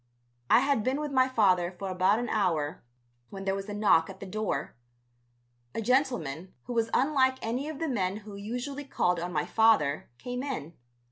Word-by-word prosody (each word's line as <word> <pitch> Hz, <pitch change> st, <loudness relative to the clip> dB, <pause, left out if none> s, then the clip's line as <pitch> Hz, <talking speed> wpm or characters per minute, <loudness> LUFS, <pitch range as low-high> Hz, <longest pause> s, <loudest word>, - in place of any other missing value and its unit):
I -, -, +6 dB
had 275 Hz, -5 st, +1 dB
been 260 Hz, +4 st, 0 dB
with 300 Hz, -1 st, -3 dB
my 260 Hz, -1 st, +3 dB
father 185 Hz, -8 st, +3 dB
for 195 Hz, -, -4 dB
about 185 Hz, +3 st, +3 dB
an 240 Hz, +1 st, -2 dB
hour 165 Hz, -7 st, 0 dB, 0.5 s
when 195 Hz, -1 st, -7 dB
there 195 Hz, -, +1 dB
was 195 Hz, +1 st, -5 dB
a -, -, -4 dB
knock 205 Hz, -6 st, +4 dB
at 190 Hz, 0 st, -10 dB
the -, -, -7 dB
door. 215 Hz, +3 st, -3 dB, 1.0 s
A -, -, -1 dB
gentleman, 210 Hz, -, 0 dB
who 245 Hz, -, -6 dB
was 230 Hz, -1 st, +1 dB
unlike 260 Hz, -1 st, +3 dB
any 250 Hz, +6 st, -2 dB
of 310 Hz, -, -6 dB
the 325 Hz, +2 st, -2 dB
men 200 Hz, -7 st, -1 dB
who 210 Hz, -, -9 dB
usually 245 Hz, +8 st, -5 dB
called 180 Hz, -10 st, 0 dB
on 175 Hz, +1 st, -4 dB
my 150 Hz, -3 st, 0 dB
father, 220 Hz, -11 st, +3 dB
came 245 Hz, -, -5 dB
in. 210 Hz, -, -4 dB
215 Hz, 190 wpm, -29 LUFS, 185-260 Hz, 1.0 s, I